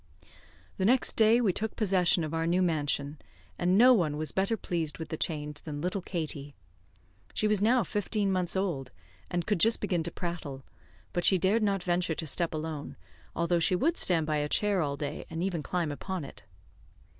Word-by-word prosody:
The 190 Hz, -, 0 dB
next 250 Hz, +4 st, +4 dB
day, 225 Hz, +1 st, +5 dB
we 210 Hz, -7 st, +2 dB
took 220 Hz, +3 st, -3 dB
possession 185 Hz, -5 st, +2 dB
of 155 Hz, 0 st, -4 dB
our 165 Hz, 0 st, 0 dB
new 180 Hz, +2 st, +2 dB
mansion, 145 Hz, -3 st, -1 dB, 0.4 s
and 180 Hz, +2 st, +3 dB
no 250 Hz, +3 st, +8 dB
one 160 Hz, -9 st, +1 dB
was 155 Hz, 0 st, -3 dB
better 195 Hz, +4 st, 0 dB
pleased 165 Hz, -6 st, -3 dB
with 160 Hz, -, -7 dB
the -, -, -3 dB
change 150 Hz, -2 st, -3 dB
than 150 Hz, -2 st, -6 dB
little 180 Hz, +5 st, -2 dB
Katie. 155 Hz, -5 st, -4 dB, 0.8 s
She 215 Hz, -, +1 dB
was 210 Hz, -2 st, +3 dB
now 235 Hz, +3 st, +4 dB
fifteen 205 Hz, +1 st, -1 dB
months 180 Hz, -1 st, 0 dB
old, 170 Hz, -9 st, -2 dB, 0.4 s
and 175 Hz, -1 st, -2 dB
could 210 Hz, -4 st, 0 dB
just 225 Hz, +6 st, +5 dB
begin 180 Hz, -5 st, 0 dB
to 165 Hz, -, -2 dB
prattle, 160 Hz, -7 st, -5 dB, 0.5 s
but 175 Hz, -2 st, -1 dB
she 190 Hz, -, +5 dB
dared 195 Hz, +6 st, +2 dB
not 200 Hz, -3 st, 0 dB
venture 175 Hz, -2 st, 0 dB
to 160 Hz, -, -4 dB
step 165 Hz, +3 st, 0 dB
alone, 155 Hz, -2 st, -5 dB, 0.4 s
although 170 Hz, +1 st, +1 dB
she 180 Hz, +2 st, +2 dB
would 320 Hz, -, +1 dB
stand 165 Hz, -, +2 dB
by 155 Hz, 0 st, 0 dB
a 150 Hz, 0 st, -1 dB
chair 205 Hz, 0 st, +1 dB
all 140 Hz, -2 st, -2 dB
day, 145 Hz, 0 st, -5 dB
and 165 Hz, +1 st, -3 dB
even 180 Hz, -4 st, -1 dB
climb 170 Hz, 0 st, -2 dB
upon 180 Hz, +2 st, -5 dB
it. -, -, -12 dB
175 Hz, 195 wpm, -29 LUFS, 155-195 Hz, 0.8 s, no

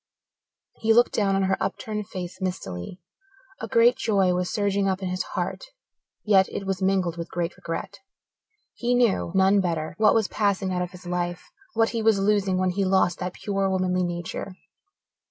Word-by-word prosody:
He 225 Hz, 0 st, +3 dB
looked 240 Hz, +1 st, +4 dB
down 195 Hz, -2 st, +2 dB
on 195 Hz, -, +1 dB
her 190 Hz, 0 st, +1 dB
upturned 210 Hz, -2 st, -3 dB
face 185 Hz, +1 st, -7 dB
mistily. 180 Hz, -, -4 dB, 0.6 s
A 225 Hz, -, -4 dB
great 230 Hz, +3 st, +5 dB
joy 195 Hz, -5 st, +2 dB
was 180 Hz, 0 st, -1 dB
surging 200 Hz, -2 st, +1 dB
up 190 Hz, 0 st, -2 dB
in 185 Hz, -, -2 dB
his 185 Hz, 0 st, -2 dB, 0.2 s
heart -, -, -3 dB, 0.6 s
yet 195 Hz, -3 st, +4 dB
it 195 Hz, -, -5 dB
was 195 Hz, 0 st, -2 dB
mingled 190 Hz, -3 st, +1 dB
with 170 Hz, 0 st, -5 dB
great 175 Hz, 0 st, -3 dB
regret. 180 Hz, +4 st, -6 dB, 0.7 s
He 245 Hz, +1 st, 0 dB
knew 235 Hz, -8 st, +2 dB
none 190 Hz, +1 st, +4 dB
better 165 Hz, -3 st, -2 dB
what 215 Hz, -1 st, +5 dB
was 220 Hz, -3 st, +2 dB
passing 200 Hz, -3 st, 0 dB
out 180 Hz, -, -1 dB
of 180 Hz, -, -2 dB
his 180 Hz, 0 st, -14 dB
life, 175 Hz, 0 st, -3 dB, 0.2 s
what 225 Hz, 0 st, +3 dB
he 230 Hz, -, -2 dB
was 220 Hz, -2 st, +4 dB
losing 195 Hz, -1 st, +2 dB
when 185 Hz, 0 st, +1 dB
he 195 Hz, +2 st, -1 dB
lost 185 Hz, -2 st, +2 dB
that 180 Hz, 0 st, -3 dB
pure, 195 Hz, -1 st, -1 dB
womanly 185 Hz, -1 st, +1 dB
nature. 175 Hz, +2 st, -4 dB
190 Hz, 180 wpm, -25 LUFS, 180-205 Hz, 0.7 s, great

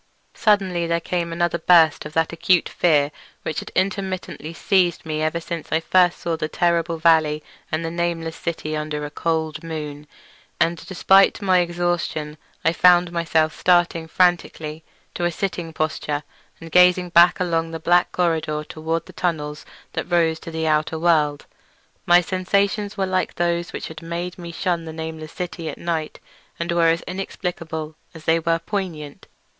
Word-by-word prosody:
Suddenly 190 Hz, -5 st, +2 dB
there 170 Hz, 0 st, +1 dB
came 170 Hz, 0 st, -2 dB
another 170 Hz, 0 st, 0 dB
burst 160 Hz, -3 st, +4 dB
of 150 Hz, -, -13 dB
that 160 Hz, 0 st, +1 dB
acute 170 Hz, +1 st, +2 dB
fear 150 Hz, -4 st, +2 dB, 0.3 s
which 155 Hz, -, -2 dB
had -, -, -8 dB
intermittently 185 Hz, -5 st, -2 dB
seized 175 Hz, 0 st, +1 dB
me 155 Hz, -1 st, -2 dB
ever 155 Hz, +2 st, 0 dB
since 170 Hz, -1 st, -6 dB
I 160 Hz, -, +3 dB
first 175 Hz, +1 st, +3 dB
saw 170 Hz, -1 st, -2 dB
the 155 Hz, -1 st, -3 dB
terrible 170 Hz, 0 st, 0 dB
valley 160 Hz, -2 st, +3 dB, 0.3 s
and 155 Hz, +1 st, -1 dB
the 165 Hz, -, -3 dB
nameless 170 Hz, -1 st, -2 dB
city 160 Hz, -2 st, -4 dB
under 150 Hz, -1 st, -3 dB
a 145 Hz, -, -7 dB
cold 160 Hz, -1 st, -2 dB
moon, 150 Hz, -2 st, -6 dB, 0.5 s
and 170 Hz, 0 st, +1 dB
despite 195 Hz, +1 st, +4 dB
my 190 Hz, -3 st, +3 dB
exhaustion 175 Hz, -3 st, -2 dB, 0.3 s
I 165 Hz, -, +4 dB
found 175 Hz, 0 st, +5 dB
myself 160 Hz, -2 st, +1 dB
starting 175 Hz, -2 st, +2 dB
frantically 160 Hz, -3 st, 0 dB, 0.3 s
to 175 Hz, -, -2 dB
a -, -, +3 dB
sitting 175 Hz, -2 st, -3 dB
posture 155 Hz, -2 st, -2 dB, 0.4 s
and 165 Hz, 0 st, -10 dB
gazing 180 Hz, 0 st, +5 dB
back 175 Hz, +2 st, +6 dB
along 165 Hz, -2 st, 0 dB
the 165 Hz, 0 st, -6 dB
black 175 Hz, +2 st, +3 dB
corridor 160 Hz, -3 st, 0 dB
toward 160 Hz, +2 st, -3 dB
the -, -, -14 dB
tunnels 150 Hz, -4 st, -3 dB, 0.3 s
that -, -, -4 dB
rose 165 Hz, -2 st, +2 dB
to 170 Hz, -, -9 dB
the 160 Hz, 0 st, -3 dB
outer 155 Hz, +1 st, +1 dB
world. 155 Hz, -3 st, +2 dB, 0.6 s
My 175 Hz, 0 st, +7 dB
sensations 200 Hz, +3 st, 0 dB
were 195 Hz, -, +1 dB
much 190 Hz, -, -6 dB
like 185 Hz, 0 st, 0 dB
those 170 Hz, 0 st, -1 dB
which -, -, -5 dB
had 160 Hz, -1 st, -9 dB
made 170 Hz, +2 st, -5 dB
me 170 Hz, -1 st, -7 dB
shun 170 Hz, 0 st, -1 dB
the 160 Hz, -, -7 dB
nameless 160 Hz, -1 st, -6 dB
city 170 Hz, -2 st, -5 dB
at -, -, -7 dB
night, 165 Hz, -3 st, -3 dB, 0.4 s
and 170 Hz, +1 st, -2 dB
were 170 Hz, -1 st, +3 dB
as 165 Hz, +1 st, +2 dB
inexplicable 165 Hz, -4 st, -5 dB, 0.2 s
as 160 Hz, -, -11 dB
they 165 Hz, +1 st, +3 dB
were 165 Hz, 0 st, +1 dB
poignant. 165 Hz, -5 st, -5 dB
165 Hz, 170 wpm, -22 LUFS, 160-175 Hz, 0.6 s, My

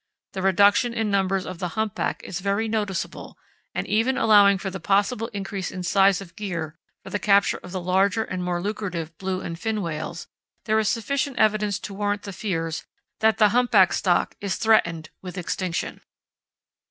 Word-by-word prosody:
The 190 Hz, -, -3 dB
reduction 205 Hz, +5 st, +4 dB
in 220 Hz, -2 st, 0 dB
numbers 195 Hz, -1 st, +1 dB
of 185 Hz, -2 st, -7 dB
the 180 Hz, +2 st, -4 dB
humpback 220 Hz, -2 st, -2 dB
is 180 Hz, -, -5 dB
very 200 Hz, +3 st, 0 dB
noticeable, 210 Hz, -4 st, -3 dB, 0.4 s
and -, -, -1 dB
even 230 Hz, +5 st, +1 dB
allowing 205 Hz, -2 st, +6 dB
for 195 Hz, 0 st, -4 dB
the 190 Hz, -, -6 dB
possible 205 Hz, +5 st, +1 dB
increase 195 Hz, -2 st, -4 dB
in 185 Hz, -, -6 dB
size 195 Hz, +1 st, +3 dB
of 175 Hz, -3 st, -12 dB
gear 165 Hz, -7 st, -4 dB, 0.3 s
for -, -, -10 dB
the 205 Hz, -, -1 dB
capture 200 Hz, -1 st, +3 dB
of 180 Hz, -, -10 dB
the 185 Hz, -, -3 dB
larger 190 Hz, +4 st, +2 dB
and 185 Hz, -4 st, -4 dB
more 175 Hz, -1 st, -1 dB
lucrative 180 Hz, -6 st, -4 dB
blue 190 Hz, -1 st, -2 dB
and 165 Hz, -1 st, -6 dB
fin 220 Hz, +2 st, -1 dB
whales, 160 Hz, -3 st, -5 dB, 0.4 s
there 220 Hz, 0 st, +2 dB
is 215 Hz, -, +1 dB
sufficient 265 Hz, +4 st, -1 dB
evidence 215 Hz, -2 st, +2 dB
to 195 Hz, +1 st, -7 dB
warrant 205 Hz, 0 st, -1 dB
the 200 Hz, -, -7 dB
fears 165 Hz, -5 st, -3 dB, 0.4 s
that 220 Hz, -1 st, +3 dB
the 210 Hz, -1 st, +5 dB
humpback 230 Hz, -5 st, +4 dB
stock 175 Hz, -3 st, +1 dB
is 200 Hz, -2 st, -1 dB
threatened 170 Hz, -8 st, +2 dB
with 185 Hz, 0 st, -8 dB
extinction. 180 Hz, 0 st, -3 dB
195 Hz, 175 wpm, -24 LUFS, 185-215 Hz, 0.4 s, allowing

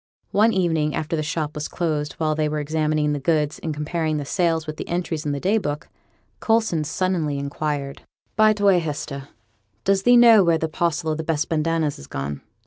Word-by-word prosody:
One 215 Hz, +3 st, +4 dB
evening 160 Hz, -6 st, +1 dB
after 155 Hz, +1 st, -2 dB
the 155 Hz, -, -1 dB
shop 155 Hz, 0 st, -3 dB
was 150 Hz, 0 st, -4 dB
closed, 155 Hz, -4 st, -2 dB
while 155 Hz, -1 st, 0 dB
they 155 Hz, 0 st, 0 dB
were 150 Hz, 0 st, -2 dB
examining 155 Hz, 0 st, 0 dB
the 145 Hz, -, -2 dB
goods, 150 Hz, +1 st, 0 dB
and 160 Hz, -, -4 dB
comparing 155 Hz, +1 st, -2 dB
the 145 Hz, -, -4 dB
sales 165 Hz, -1 st, 0 dB
with 155 Hz, 0 st, -6 dB
the -, -, -6 dB
entries 170 Hz, -3 st, -2 dB
in -, -, 0 dB
the 140 Hz, -, -2 dB
day 200 Hz, +8 st, +2 dB
book, 150 Hz, -5 st, -4 dB, 0.5 s
Coulson 220 Hz, -8 st, +1 dB
suddenly 160 Hz, -3 st, -1 dB
inquired 140 Hz, 0 st, -3 dB, 0.3 s
'By 215 Hz, 0 st, +5 dB
the 205 Hz, -1 st, -5 dB
way, 195 Hz, -3 st, +5 dB
Hester, 145 Hz, -3 st, -5 dB, 0.6 s
does 195 Hz, 0 st, +2 dB
thee 245 Hz, +4 st, +6 dB
know 230 Hz, -4 st, +8 dB
where 170 Hz, -2 st, +3 dB
the 160 Hz, -, -1 dB
parcel 165 Hz, -1 st, -1 dB
of 160 Hz, +1 st, -3 dB
best 160 Hz, -1 st, 0 dB
bandanas 160 Hz, -2 st, 0 dB
is 70 Hz, -, -11 dB
gone? 70 Hz, +1 st, -5 dB
155 Hz, 200 wpm, -23 LUFS, 150-175 Hz, 0.6 s, know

